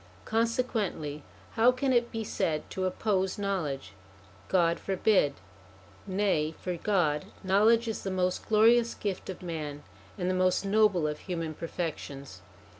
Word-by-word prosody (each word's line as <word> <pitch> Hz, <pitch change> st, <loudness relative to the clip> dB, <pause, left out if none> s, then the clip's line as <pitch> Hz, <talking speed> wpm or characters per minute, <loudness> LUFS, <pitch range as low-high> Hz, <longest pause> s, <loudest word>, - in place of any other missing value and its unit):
Consequently, 225 Hz, -, -1 dB, 0.3 s
how 235 Hz, +2 st, +5 dB
can 260 Hz, +1 st, 0 dB
it 240 Hz, -1 st, +2 dB
be 225 Hz, -1 st, -3 dB
said 155 Hz, -7 st, -1 dB
to 185 Hz, -, -2 dB
oppose 190 Hz, 0 st, 0 dB
knowledge? 180 Hz, -9 st, -2 dB, 0.6 s
God 170 Hz, -2 st, +2 dB
forbid! 190 Hz, -6 st, +2 dB, 0.7 s
Nay, 185 Hz, -6 st, 0 dB
for 180 Hz, -1 st, -3 dB
God, 165 Hz, -6 st, +1 dB, 0.2 s
knowledge 220 Hz, +5 st, +4 dB
is 220 Hz, -, -3 dB
the 195 Hz, -, -3 dB
most 185 Hz, -1 st, -1 dB
glorious 230 Hz, +2 st, +5 dB
gift 195 Hz, -3 st, -4 dB
of 185 Hz, -, -7 dB
man, 150 Hz, -4 st, -5 dB, 0.3 s
and 180 Hz, -2 st, -2 dB
the 185 Hz, -, +1 dB
most 185 Hz, +1 st, +2 dB
noble 200 Hz, -5 st, +3 dB
of 150 Hz, 0 st, -3 dB
human 165 Hz, -3 st, -4 dB
perfections. 145 Hz, -, -5 dB
185 Hz, 135 wpm, -29 LUFS, 160-215 Hz, 0.7 s, how